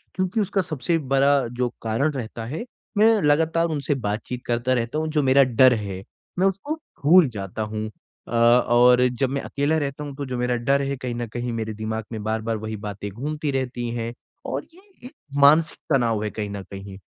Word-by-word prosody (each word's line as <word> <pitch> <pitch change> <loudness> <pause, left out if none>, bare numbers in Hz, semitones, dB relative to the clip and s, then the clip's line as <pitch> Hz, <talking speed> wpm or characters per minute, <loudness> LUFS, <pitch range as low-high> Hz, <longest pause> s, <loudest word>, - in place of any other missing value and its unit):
क्योंकि 185 +4 0
उसका 200 -1 0
सबसे 165 -1 -1 0.2
बड़ा 140 -1 +4
जो 125 +1 -2
कारण 115 +7 0
रहता 115 -3 -5
है, 155 - -5 0.3
मैं 220 0 +5
लगातार 160 +2 +2
उनसे 145 -2 -1
बातचीत 115 +1 -3
करता 120 +2 0
रहता 120 +3 -1
हूँ, 160 +1 -1
जो 155 -1 +1
मेरा 135 +1 +6
डर 130 0 +5
है, 100 -4 -4 0.4
मैं 190 - +4
उसको 200 - -2 0.3
भूल 170 +2 +7
जाता 100 -2 -5
हूँ। 110 0 -3 0.4
अ, - - -11
और 120 +1 +5
जब 125 +1 -1
मैं 140 +1 -2
अकेला 145 +3 0
रहता 145 -1 -3
हूँ 140 -2 -7
तो 140 - -4
जो 125 -2 -4
मेरा 125 0 0
डर 135 +4 +2
है 140 0 -1
कहीं 125 -2 -4
न 120 0 -3
कहीं 120 0 -3
मेरे 110 -1 -3
दिमाग 110 +1 -4
में 110 -2 -5
बार-बार 110 +1 -1
वही 110 +1 -5
बातें 100 0 -5
घूमती 150 +7 -3
रहती 125 -3 -2
हैं 115 0 -3 0.3
और 135 +2 -3
ये 365 - -18 0.3
एक - - -13 0.3
मानसिक 155 +3 +5 0.2
तनाव 115 -5 +2
है 105 - -1
कहीं 105 -2 -4
न 100 0 -5
कहीं। 100 0 -8
125 Hz, 200 wpm, -23 LUFS, 115-145 Hz, 0.4 s, भूल